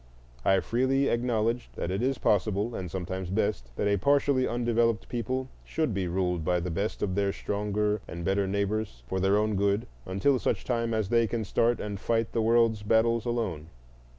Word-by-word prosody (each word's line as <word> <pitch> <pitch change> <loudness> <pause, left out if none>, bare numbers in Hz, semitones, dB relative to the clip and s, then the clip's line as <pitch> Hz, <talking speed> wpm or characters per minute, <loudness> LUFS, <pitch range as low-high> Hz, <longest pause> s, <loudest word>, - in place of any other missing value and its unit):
I 95 -1 +4
freely 130 +3 +1
acknowledged 120 0 0
that 90 - -3
it 95 +3 -1
is 130 +1 +1
possible, 105 +2 +1
and 90 -5 -4
sometimes 95 +1 -4
best, 100 - -1
that 100 - 0
a 100 0 +3
partially 140 +2 +2
undeveloped 115 -1 +1
people 130 +2 -2 0.2
should 155 -8 -1
be 95 -2 -1
ruled 90 -1 -1
by 90 +2 +1
the 90 +1 -3
best 100 +6 -2
of 95 - 0
their 100 0 +1
stronger 105 +1 -1
and 85 +1 -6
better 95 0 +1
neighbors 100 - -2
for 95 +7 -2
their 95 +2 +3
own 105 0 +1
good, 100 +2 +1 0.2
until 100 +9 +2
such - - -1
time 115 -2 0
as 110 -3 -1
they 115 -1 +3
can 115 0 -2
start 115 +4 +2
and 100 -2 -4
fight 115 +1 0
the 115 - 0
world's 115 -1 +3
battles 115 +2 +2
alone. 105 -11 -2
105 Hz, 185 wpm, -28 LUFS, 95-115 Hz, 0.2 s, I